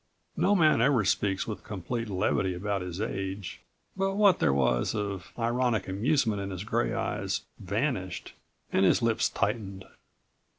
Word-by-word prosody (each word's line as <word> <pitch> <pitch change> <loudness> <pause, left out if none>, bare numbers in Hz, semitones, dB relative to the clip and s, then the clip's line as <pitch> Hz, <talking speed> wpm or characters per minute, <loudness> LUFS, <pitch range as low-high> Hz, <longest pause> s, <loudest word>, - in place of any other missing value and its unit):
No 205 - +3
man 155 - +4
ever 125 -4 +3
speaks 95 0 +1
with 110 - -6
complete 110 +4 -4
levity 95 -1 0
about 100 +2 -2
his 90 0 -5
age, 95 -3 -4 0.3
but 195 0 0
what 200 -3 +5
there - - +3
was 65 -3 +1
of 100 -5 -4
ironic 120 -2 0
amusement 105 +1 +1
in 100 - -4
his 95 -1 -5
gray - - 0
eyes - - -2 0.2
vanished 100 - -2 0.4
and 95 - +3
his 95 - +4
lips 115 -1 +2
tightened. 100 -3 -2
105 Hz, 145 wpm, -28 LUFS, 95-120 Hz, 0.4 s, what